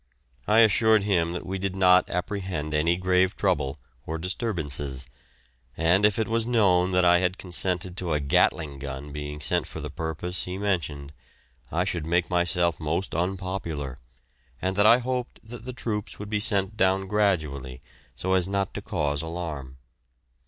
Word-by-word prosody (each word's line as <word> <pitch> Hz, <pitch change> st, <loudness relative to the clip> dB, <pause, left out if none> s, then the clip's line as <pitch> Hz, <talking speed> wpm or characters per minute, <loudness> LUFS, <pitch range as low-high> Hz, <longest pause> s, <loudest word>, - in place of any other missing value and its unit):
I 110 Hz, +2 st, +6 dB
assured 110 Hz, -1 st, +4 dB
him 85 Hz, -5 st, +1 dB
that 90 Hz, -, -5 dB
we 95 Hz, +2 st, -3 dB
did 95 Hz, 0 st, -2 dB
not 90 Hz, -1 st, +5 dB
apprehend 90 Hz, -4 st, -3 dB
any 85 Hz, +3 st, +2 dB
grave 90 Hz, +1 st, +2 dB
trouble, 75 Hz, -8 st, 0 dB, 0.3 s
or 80 Hz, -, -2 dB
disturbances, 75 Hz, -, -2 dB, 0.7 s
and 90 Hz, +6 st, +4 dB
if 105 Hz, +2 st, -2 dB
it 110 Hz, -, 0 dB
was 115 Hz, 0 st, +1 dB
known 95 Hz, -6 st, +3 dB
that 90 Hz, 0 st, +4 dB
I 90 Hz, 0 st, +6 dB
had 90 Hz, +1 st, 0 dB
consented 90 Hz, 0 st, -1 dB
to 90 Hz, -4 st, -1 dB
a 75 Hz, -, +1 dB
Gatling 70 Hz, +1 st, +1 dB
gun 70 Hz, +1 st, -6 dB
being 75 Hz, 0 st, -6 dB
sent -, -, 0 dB
for -, -, -7 dB
the -, -, -6 dB
purpose 80 Hz, +3 st, -3 dB
he 90 Hz, +1 st, -4 dB
mentioned, 80 Hz, -8 st, -2 dB, 0.6 s
I 85 Hz, +3 st, +1 dB
should 85 Hz, -4 st, -3 dB
make 85 Hz, +2 st, +1 dB
myself 85 Hz, -1 st, +2 dB
most 85 Hz, +4 st, -2 dB
unpopular, 85 Hz, -6 st, -3 dB, 0.6 s
and 95 Hz, 0 st, -1 dB
that 100 Hz, +2 st, +5 dB
I 115 Hz, -, +8 dB
hoped 125 Hz, 0 st, -3 dB
that 115 Hz, +1 st, -10 dB
the 130 Hz, -, -4 dB
troops 110 Hz, -4 st, -4 dB
would 105 Hz, +1 st, -8 dB
be 105 Hz, -, +1 dB
sent 105 Hz, -1 st, +1 dB
down 95 Hz, -1 st, +2 dB
gradually 80 Hz, -11 st, -1 dB, 0.3 s
so 95 Hz, +10 st, -1 dB
as 95 Hz, -1 st, +2 dB
not 100 Hz, -1 st, -1 dB
to -, -, -5 dB
cause 75 Hz, -1 st, -1 dB
alarm. 80 Hz, -6 st, -6 dB
90 Hz, 165 wpm, -26 LUFS, 80-100 Hz, 0.7 s, I